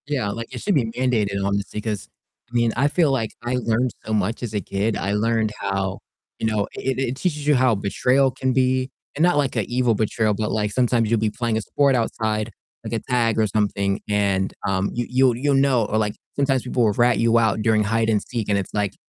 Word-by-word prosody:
Yeah, 130 -8 -1
like, 115 +3 -6
it - - -6
should 205 - +1
be 130 -6 +2
mandated 110 -4 0
honestly, 100 +1 -2
'cause 105 -3 -4 0.4
I - - -23
mean, 120 -1 +2
I 140 +4 +3
feel 160 -2 +2
like 115 -5 -1
I 120 +1 -1
learned 125 0 0
so 110 - -3
much 110 +3 -1
as 115 -3 -4
a 105 - 0
kid, 100 +3 -1
I 100 - -2
learned 110 0 +1
how, 95 -1 -2 0.4
you 110 - 0
know, 105 -2 0
it 130 -1 -2
it 130 -1 -1
teaches 150 -1 -2
you 150 - +5
how 130 -3 +3
betrayal 125 +7 +2
can 130 +1 -1
be 130 0 +1 0.3
and 155 - +1
not 175 -3 +4
like 140 -3 0
a - - +2
evil 125 -1 +1
betrayal, 110 0 +1
but, 105 +1 -2
like, 105 -1 0
sometimes 120 -1 +1
you'll 115 - +3
be 110 0 +1
playing 115 0 -2
a - - -1
sport 140 +4 +2
outside, 110 -2 -1 0.4
like - - -5
a 115 - 0
tag 115 -3 +2
or 110 - +3
something, 100 -1 0
and, 100 -2 +1
um, 95 0 0
you 120 0 -2
you'll 125 -1 +3
you'll 140 +3 +1
know, 135 -3 +3
or, 110 - -1
like, 105 -1 0 0.2
sometimes 135 -2 +1
people 125 -1 0
will 105 -2 +3
rat 120 +3 +3
you 115 0 +3
out 110 -2 +2
during 110 -1 +3
hide 115 +2 +1
and 105 -2 +2
seek, 115 -4 -4
and 100 - +2
it's, 100 - -4
like, 105 -2 -1
115 Hz, 235 wpm, -22 LUFS, 105-125 Hz, 0.4 s, you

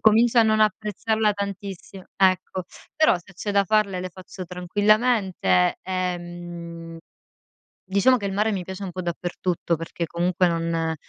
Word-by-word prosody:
comincio 225 +2 +5
a 230 - +8
non 215 0 +3
apprezzarla 215 +1 +1
tantissimo. 195 -1 -6
Ecco. 185 -1 +2 0.3
Però 310 -10 +5
se 190 +3 -18
c'è 205 +4 -4
da 200 0 +4
farle 200 -2 +1
le 185 - -4
faccio 185 +1 -9
tranquillamente. 190 - +2
Ehm 175 -2 -5 0.9
diciamo 200 +7 +4
che 205 - -6
il 195 - -2
mare 210 +3 +1
mi 190 -4 -2
piace 190 +2 -7
un 190 - -4
po' 185 - -4
dappertutto 175 0 -2
perché 165 +1 -4
comunque 180 +2 +1
non 165 -1 -1
185 Hz, 145 wpm, -24 LUFS, 175-205 Hz, 0.9 s, a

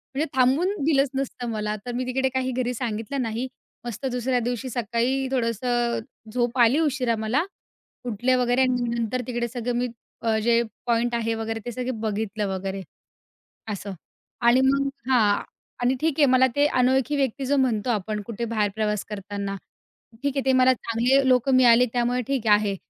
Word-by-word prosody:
म्हणजे 295 +3 +1
थांबून 280 +10 +3
दिलंच 280 -3 +3
नसतं 255 -3 -3
मला. 210 -1 -2
तर 245 - -4
मी 255 +1 -2
तिकडे 265 +1 0
काही 260 0 -1
घरी 250 0 -1
सांगितलं 230 +2 -3
नाही. 235 +2 -2 0.4
मस्त 240 +3 -5
दुसऱ्या 250 +1 0
दिवशी 245 +1 -3
सकाळी 245 +3 -1
थोडंसं 240 -1 0 0.3
झोप 240 0 0
आली 240 +5 +5
उशिरा 265 -7 +1
मला. 220 +7 0 0.7
उठले 245 +5 +1
वगैरे 250 +1 +2
आणि 255 -1 +2
नंतर 235 +2 -1
तिकडे 240 -1 -2
सगळं 245 0 -3
मी, 245 +1 0 0.5
जे 235 +1 +3 0.2
पॉइंट 235 0 +1
आहे 230 -1 0
वगैरे 225 0 -3
ते 240 - -3
सगळे 250 +2 -3
बघितलं 215 -2 -2
वगैरे, 190 0 -3 0.9
असं. 200 0 -6 0.5
आणि 240 +2 +5
मग 275 +1 +2 0.2
हां. 215 -5 +3 0.4
आणि 250 +2 +3
ठीक 320 -1 +1
आहे 290 - +6
मला 260 0 +5
ते 290 0 +4
अनोळखी 260 +1 +2
व्यक्ती 270 -1 -1
जो 285 +2 +2
म्हणतो 250 -4 +1
आपण 215 -1 -1
कुठे 235 0 -4
बाहेर 210 -2 +1
प्रवास 210 -2 -1
करताना, 200 -1 -5 0.7
ठीक 280 - 0
आहे 275 - 0
ते 265 - +4
मला 255 0 +5
चांगले 250 +3 +1
लोक 255 0 +3
मिळाले 250 -1 +6
त्यामुळे 245 0 +1
ठीक 265 -5 -1
आहे. 205 -1 +3
245 Hz, 170 wpm, -24 LUFS, 225-260 Hz, 0.9 s, आहे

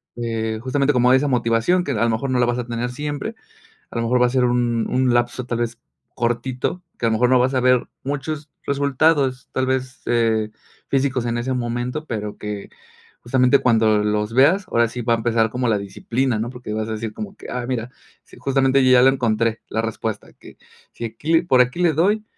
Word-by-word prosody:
eh, 115 -2 -2
justamente 140 +3 +1
como 125 -1 +4
hay 130 - +6
esa 145 +2 0
motivación, 120 +7 +2
que 145 - -3
a 115 -3 0
lo 120 - +2
mejor 115 +4 -1
no 125 - +1
la 120 - +3
vas 120 0 0
a 125 - -3
tener 120 +1 -3
siempre, 145 +2 -4 0.5
a - - -14
lo 115 - 0
mejor 125 +2 +2
va 125 - +5
a - - -1
ser 130 0 +1
un 120 -2 +1
un 130 -1 +2
lapso 120 +1 0
tal 120 -1 -2
vez 120 0 -3 0.4
cortito, 125 +8 -2 0.2
que 115 - +1
a - - +3
lo - - +1
mejor 120 +3 +2
no 130 - +5
vas 130 +2 +1
a - - +3
ver 125 -1 +3 0.2
muchos 145 +2 -4 0.2
resultados, 140 -1 +1
tal 130 - 0
vez, 130 0 -2
eh, 110 -2 +1 0.4
físicos 130 -3 0
en 120 0 -1
ese 130 +2 -2
momento, 125 +4 -3
pero 105 -6 -5
que, 105 -1 -6 0.5
justamente 125 +2 +3
cuando 110 -4 +3
los 105 +1 -1
veas, 180 +9 +4
ahora 120 -8 +2
sí 120 +2 -5
va 120 0 +1
a - - +2
empezar 115 -1 +1
como 125 +2 -2
la 105 -2 +2
disciplina, 115 +5 -2
¿no?, 115 +3 -3
porque 125 -4 -7
vas 110 0 -2
a - - -5
decir 110 0 -5
como 200 -2 -7
que, - - -12
ah, 125 -1 -3
mira, 125 -2 -3 0.4
sí, - - -17
justamente 135 0 +2
yo 130 - +5
ya 125 -1 +7
la 130 - +7
encontré, 115 -3 0
la 110 - -1
respuesta, 115 -1 -4
que - - -16 0.4
si 120 - -5
aquí 130 +8 -3
le 165 - +5
por 130 -7 +4
aquí 125 +6 0
le 170 -3 +3
doy, 200 +8 +2
125 Hz, 225 wpm, -21 LUFS, 115-135 Hz, 0.5 s, ya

